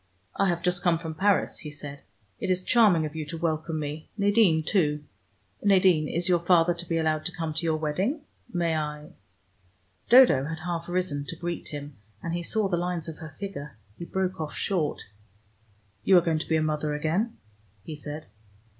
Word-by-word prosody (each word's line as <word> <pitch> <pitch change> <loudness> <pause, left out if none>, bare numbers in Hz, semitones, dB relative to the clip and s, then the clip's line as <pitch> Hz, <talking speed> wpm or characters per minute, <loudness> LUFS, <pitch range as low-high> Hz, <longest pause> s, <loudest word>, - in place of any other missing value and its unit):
"I 195 - +2
have 170 0 -1
just 180 0 +1
come 175 -2 +3
from 160 -1 -6
Paris," 195 +4 +1
he 150 - -7
said. 145 -1 -9 0.4
"It - - -3
is 185 0 +1
charming 205 -10 +4
of 150 0 -6
you 160 - -3
to 165 +2 -5
welcome 160 -1 -1
me. 150 +1 -5
Nadine, 200 -6 +4
too. 150 -6 +1 0.6
Nadine, 185 -6 +4
is 170 +4 -1
your 175 -2 +4
father 175 0 +4
to 170 0 -8
be 165 - +1
allowed 155 -1 +1
to 180 - -1
come 165 -3 -4
to 160 - -3
your 160 -1 +2
wedding? 185 - -1 0.3
May 170 -2 0
I 150 -1 -4 0.5
" 90 -1 -38
Dodo 245 - +7
had 160 +2 -5
half 170 0 -4
risen 175 -6 -1
to 165 - -5
greet 170 +1 -4
him, 145 -2 -7 0.3
and 170 - -3
he 175 - -1
saw 210 +4 0
the 180 -2 0
lines 175 -2 -2
of 160 -2 -7
her 155 -3 -9
figure. 150 - -7 0.2
He 170 - -7
broke 185 -1 -2
off 155 - -5
short. 170 -7 -1 1.0
"You 190 - +6
are - - +7
going 160 -2 +1
to - - -6
be 160 - +3
a 155 - +1
mother 150 -1 -1
again?" 170 +10 -1 0.5
he 155 - -6
said. 150 +1 -7
165 Hz, 200 wpm, -27 LUFS, 150-180 Hz, 1.0 s, Dodo